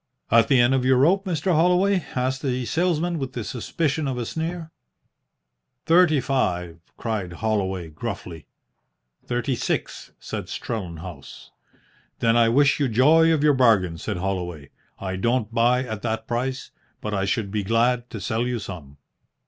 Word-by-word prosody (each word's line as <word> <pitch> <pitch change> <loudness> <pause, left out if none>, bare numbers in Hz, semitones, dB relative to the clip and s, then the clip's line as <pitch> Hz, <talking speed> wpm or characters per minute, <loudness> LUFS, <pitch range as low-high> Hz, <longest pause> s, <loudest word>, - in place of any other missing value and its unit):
"At 115 0 +5
the 135 - +4
end 120 +2 +4
of 130 -1 +1
your 130 0 +4
rope, 185 +9 +3
Mr. 180 0 0
Holloway?" 180 +3 +3
asked 130 +1 -1
the 130 -2 -1
salesman, 170 +2 0
with 135 -2 -4
the 120 - -4
suspicion 145 +6 -2
of 130 -2 -2
a 120 - -2
sneer. 165 +3 -4 1.1
"Thirty 165 -3 +5
five," 90 -11 -1 0.2
cried 105 -6 -3
Holloway 95 -3 -1
gruffly. 90 -2 -7 0.8
"Thirty 120 +1 -1
six," - - -3
said - - -5
Strellenhaus. 85 - -7 0.7
"Then 115 0 +2
I 115 -1 +5
wish 140 +5 +3
you 140 - +2
joy 155 +8 +5
of 155 -2 +1
your 150 -1 +5
bargain," 105 -10 +3
said - - -3
Holloway. 90 -6 -4 0.3
"I 95 -1 -4
don't 115 +2 0
buy 120 +2 +3
at 110 -4 -6
that 110 -1 -3
price, 130 +2 -3 0.3
but 105 - -4
I 95 -1 0
should 100 0 -1
be 105 0 -1
glad 120 +4 +1
to 110 - -6
sell 110 +6 -1
you 125 -1 -1
some." 85 -10 -9
120 Hz, 155 wpm, -24 LUFS, 100-140 Hz, 1.1 s, At